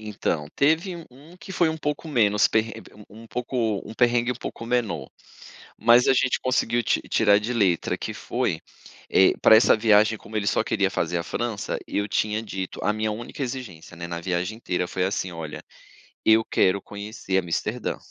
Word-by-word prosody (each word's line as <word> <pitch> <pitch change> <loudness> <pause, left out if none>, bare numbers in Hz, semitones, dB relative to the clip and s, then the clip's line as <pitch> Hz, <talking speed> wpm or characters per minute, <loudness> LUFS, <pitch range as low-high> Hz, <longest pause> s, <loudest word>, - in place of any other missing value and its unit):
Então, 105 -8 -2
teve 160 +6 +2
u 170 - -10
um 145 +8 -16
que 190 - -12
foi 175 -2 +2
um 160 - -2
pouco 150 +1 -3
menos, 105 -7 +3
perre 110 0 0 0.4
um 110 +2 -13
um - - -13
pouco 120 -3 -2
um - - -8
perrengue 120 0 +2
um - - -9
pouco 115 -1 -7
menor. 110 - -1 0.7
Mas 120 +2 +5
a - - +6
gente 125 0 +1
conseguiu 120 -2 +1
ti - - +1
tirar 105 -2 +4
de 110 +4 -3
letra 95 -7 +1
que - - -5
foi 80 - -2 0.5
eh, 95 - +5
pra 110 - +8
essa 110 0 +5
viagem 110 0 +4
como 110 - -12
ele 100 -1 -1
só - - +2
queria - - +1
fazer 90 - -1
a - - -3
França, 110 +3 -3
eu 105 0 -1
tinha 105 +1 0
dito, 95 -4 -6
a - - +2
minha 110 0 -1
única 120 +6 -5
exigência 120 -11 -7
né, 85 0 -6
na 85 0 -4
viagem 90 +4 -2
inteira 90 -5 -2
foi 90 - -2
assim 95 -1 -2
"olha, 80 -3 -7 0.6
eu 110 0 +5
quero 95 +1 +2
conhecer 100 -2 -4
Amsterdã." 90 -3 -2
110 Hz, 190 wpm, -24 LUFS, 95-120 Hz, 0.7 s, pra